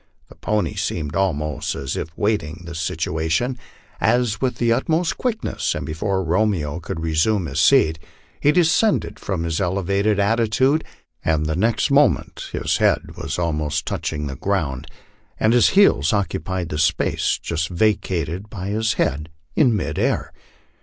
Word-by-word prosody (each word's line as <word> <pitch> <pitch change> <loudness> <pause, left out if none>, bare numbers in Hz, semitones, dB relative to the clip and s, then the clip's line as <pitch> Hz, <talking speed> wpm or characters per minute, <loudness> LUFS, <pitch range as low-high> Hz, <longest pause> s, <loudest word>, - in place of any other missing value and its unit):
The - - -15
pony 105 0 -1
seemed 80 -7 -3
almost 75 -6 -1
as 70 -1 -4
if 75 - -4
waiting 100 -6 -1
this 85 -1 -5
situation, 80 +11 -1 0.4
as 115 -2 +1
with 130 -3 0
the 115 0 +2
utmost 160 +7 0
quickness, 230 -3 -2
and - - -4
before 95 +5 -1
Romeo 85 -4 0
could 80 -1 -5
resume 80 +5 +1
his 70 +1 -1
seat, 80 - +4 0.4
he 145 - +4
descended 180 +6 +2
from 95 -5 -3
his 85 +2 -1
elevated 100 +3 +1
attitude, 115 +8 +2 0.4
and 80 -1 +1
the 80 +1 -1
next 110 - +1
moment 140 - +2
his - - 0
head - - +3
w;is - - -5
almost 75 -3 -1
touching 75 -1 -3
the 70 -2 -5
ground, 75 -5 -2 0.5
and 110 +1 +3
his 120 - +5
heels 80 - +5
occupied 95 -3 -2
the 75 - -3
space 80 - +1
just 80 -1 -2
vacated 90 -1 -1
by 95 -2 -5
his 110 +2 +1
head 75 +4 -1 0.3
in 125 -7 +4
mid 100 - -2
air. - - 0
95 Hz, 150 wpm, -21 LUFS, 80-110 Hz, 0.5 s, his